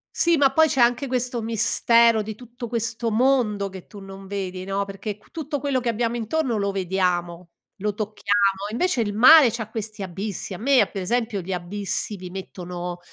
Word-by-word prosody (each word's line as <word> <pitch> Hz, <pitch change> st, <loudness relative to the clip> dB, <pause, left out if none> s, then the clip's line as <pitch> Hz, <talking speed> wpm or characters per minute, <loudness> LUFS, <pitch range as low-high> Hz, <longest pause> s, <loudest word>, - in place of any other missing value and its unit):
Sì, 340 Hz, 0 st, +3 dB
ma 275 Hz, -1 st, +4 dB
poi 320 Hz, +3 st, +5 dB
c'è 270 Hz, -, -1 dB
anche 245 Hz, +3 st, +3 dB
questo 250 Hz, -1 st, -2 dB
mistero 230 Hz, +1 st, +3 dB
di 215 Hz, +1 st, -5 dB
tutto 240 Hz, +2 st, -9 dB
questo 230 Hz, 0 st, -2 dB
mondo 220 Hz, -5 st, +2 dB
che 190 Hz, -1 st, -10 dB
tu 205 Hz, -, -12 dB
non 195 Hz, 0 st, -10 dB
vedi, 190 Hz, -2 st, -5 dB
no, 195 Hz, +1 st, -1 dB
perché 200 Hz, +1 st, -6 dB
q 210 Hz, -, -25 dB
tutto 305 Hz, -3 st, -4 dB
quello 270 Hz, -1 st, 0 dB
che 245 Hz, -, -2 dB
abbiamo 235 Hz, +1 st, -1 dB
intorno 240 Hz, +1 st, -1 dB
lo 200 Hz, -1 st, 0 dB
vediamo, 180 Hz, -2 st, -1 dB, 0.3 s
lo 210 Hz, 0 st, -1 dB
tocchiamo, 205 Hz, -1 st, 0 dB
invece 255 Hz, +1 st, 0 dB
il 205 Hz, -2 st, -2 dB
mare 255 Hz, +3 st, +8 dB
c'ha 220 Hz, -2 st, -5 dB
questi 215 Hz, -1 st, -6 dB
abissi. 195 Hz, +2 st, -5 dB
A -, -, -7 dB
me, 265 Hz, +4 st, +3 dB
a -, -, +2 dB
per 195 Hz, -3 st, -5 dB
esempio, 225 Hz, 0 st, -1 dB
gli 185 Hz, +2 st, -4 dB
abissi 195 Hz, +3 st, -3 dB
mi 180 Hz, -1 st, -9 dB
mettono 180 Hz, -2 st, -6 dB
215 Hz, 190 wpm, -23 LUFS, 195-240 Hz, 0.3 s, mare